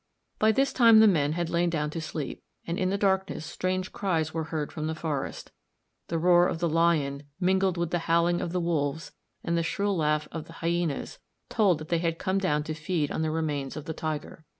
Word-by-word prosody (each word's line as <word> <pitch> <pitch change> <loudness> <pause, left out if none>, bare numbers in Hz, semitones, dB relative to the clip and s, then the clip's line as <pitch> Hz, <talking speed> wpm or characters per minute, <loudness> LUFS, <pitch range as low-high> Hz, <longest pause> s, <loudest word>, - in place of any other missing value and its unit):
By 215 +1 +5
this 270 +5 +1
time 230 -3 +7
the 220 - +8
men 150 -6 +2
had 170 0 -2
lain 175 0 +2
down 150 -3 -1
to 165 - -4
sleep, 155 -3 -5 0.2
and 170 +1 -3
in 185 - +1
the 200 - 0
darkness 190 -4 0
strange 185 +3 -2
cries 160 -5 -1
were 160 -1 -2
heard 155 -2 -3
from 155 0 -4
the 160 - -2
forest. 155 -4 -4 0.6
The 165 - -1
roar 175 +1 +5
of - - -2
the 170 +1 0
lion, 155 -4 +2 0.2
mingled 190 0 +2
with 170 -1 -1
the 175 - +1
howling 170 +1 +3
of 170 - -3
the 180 - 0
wolves 160 -3 -1 0.3
and 170 - 0
the 170 - +2
shrill 200 +4 0
laugh 150 -2 +1
of 160 -2 -5
the 165 - -13
hyænas, 170 -2 -2 0.3
told 200 -7 +3
that 155 +1 -9
they 170 - +2
had 165 -1 -1
come 190 +3 0
down 150 -6 +1
to 155 - -4
feed 155 -1 -2
on - - -2
the 160 - 0
remains 150 -4 -2
of 150 - -6
the 160 - -4
tiger. 155 0 -5
165 Hz, 220 wpm, -27 LUFS, 155-180 Hz, 0.6 s, the